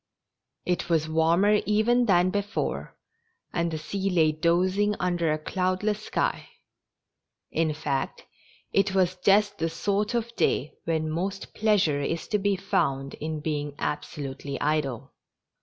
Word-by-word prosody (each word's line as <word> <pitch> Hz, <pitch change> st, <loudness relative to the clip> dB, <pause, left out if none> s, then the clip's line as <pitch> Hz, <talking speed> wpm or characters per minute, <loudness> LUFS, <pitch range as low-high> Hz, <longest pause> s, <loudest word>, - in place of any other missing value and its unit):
It 180 Hz, -1 st, -1 dB
was 160 Hz, -2 st, +2 dB
warmer 170 Hz, +6 st, +3 dB
even 235 Hz, +4 st, +3 dB
than 180 Hz, -1 st, +4 dB
before, 205 Hz, +1 st, -3 dB, 0.6 s
and 170 Hz, -1 st, 0 dB
the 160 Hz, -, -3 dB
^ -, -, -6 dB
sea 195 Hz, +5 st, -2 dB
lay 160 Hz, -4 st, +4 dB
dozing 185 Hz, +6 st, +2 dB
under 175 Hz, -3 st, +1 dB
a 155 Hz, -, +1 dB
cloudless 185 Hz, +6 st, -1 dB
sky; -, -, -1 dB, 1.0 s
in 160 Hz, -1 st, +1 dB
fact, 140 Hz, -3 st, -3 dB, 0.5 s
it 195 Hz, 0 st, +2 dB
was 185 Hz, -1 st, +3 dB
just 205 Hz, +2 st, +3 dB
the 165 Hz, +1 st, 0 dB
sort 205 Hz, +7 st, -1 dB
of 235 Hz, 0 st, -2 dB
day 145 Hz, -, +1 dB
when 160 Hz, -1 st, 0 dB
most 190 Hz, +4 st, -3 dB
pleasure 200 Hz, -10 st, +2 dB
is 165 Hz, +3 st, -2 dB
to 210 Hz, -3 st, +1 dB
be 200 Hz, 0 st, +1 dB
found 140 Hz, -9 st, -1 dB
in 155 Hz, 0 st, -4 dB
being 145 Hz, -1 st, -2 dB
abso 150 Hz, 0 st, -4 dB
lutely 135 Hz, 0 st, -5 dB
idle. 140 Hz, -4 st, -1 dB
175 Hz, 140 wpm, -26 LUFS, 155-200 Hz, 1.0 s, than